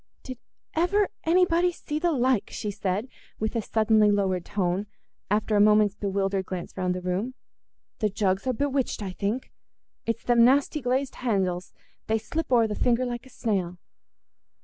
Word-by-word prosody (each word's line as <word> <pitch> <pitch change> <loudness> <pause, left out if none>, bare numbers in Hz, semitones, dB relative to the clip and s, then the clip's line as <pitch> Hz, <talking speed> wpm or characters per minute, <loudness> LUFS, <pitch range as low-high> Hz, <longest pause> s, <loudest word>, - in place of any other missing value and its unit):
"Did 255 -2 -7 0.3
ever 390 +5 +2 0.2
anybody 355 +1 +3
see 300 -3 -4
the 345 +1 +1
like?" 255 -5 +1
she 210 - -4
said, 200 +2 -2 0.3
with 220 +2 -3
a 230 - +1
suddenly 215 0 +3
lowered 190 -3 +1
tone, 190 +1 -1 0.4
after 210 +1 +1
a 205 - +5
moment's 210 -1 +5
bewildered 195 -1 -1
glance 180 -2 -6
round 180 -1 -1
the 180 - -5
room. 195 +8 -2 0.6
"The 215 - +1
jugs 195 +2 0
are 255 - +2
bewitched, 270 -3 -1
I 190 - -4
think. 205 +7 -3 0.6
It's 230 0 -1
them 240 -1 +4
nasty 280 +4 +3
glazed 260 +2 -1
handles—they 195 -1 -2
slip 285 +7 -4
o'er 235 -2 +5
the 215 - -2
finger 245 +3 +1
like 240 +1 -5
a - - -16
snail." 190 -8 -2
220 Hz, 160 wpm, -26 LUFS, 195-255 Hz, 0.6 s, a